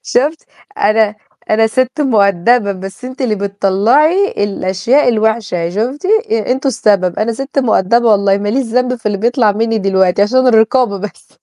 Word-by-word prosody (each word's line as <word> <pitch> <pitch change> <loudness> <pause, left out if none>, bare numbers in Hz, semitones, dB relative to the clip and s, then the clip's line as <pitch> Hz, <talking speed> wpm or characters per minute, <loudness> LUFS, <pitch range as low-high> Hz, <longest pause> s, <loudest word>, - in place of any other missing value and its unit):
شُفت 295 +6 -1 0.4
أنا 215 - +2 0.4
أنا 225 +1 +3
سِت 255 +5 -1
مؤدّبة، 205 -3 +2
بس 195 +5 -10
أنتِ 260 +2 -9
اللي 225 -4 0
بتطلّعي 210 - +1
الأشياء 200 +8 0
الوِحشة 215 -7 -1
شُفتِ، 250 - -3 0.3
أنتم 250 +5 -1
السبب، 200 -8 0
أنا 225 +2 -1
سِت 270 +4 -5
مؤدّبة 235 -1 +2
والله 200 -1 +2
ماليش 210 +7 -1
ذنب 250 +2 0
في 230 - -10
اللي 205 -2 -1
بيطلع 235 0 +1
منّي 225 +1 -1
دلوقتي 190 -1 +1
عشان 260 +5 +2
الرقابة 225 -2 +2
بس. 210 +1 -9
220 Hz, 145 wpm, -14 LUFS, 200-255 Hz, 0.4 s, أنا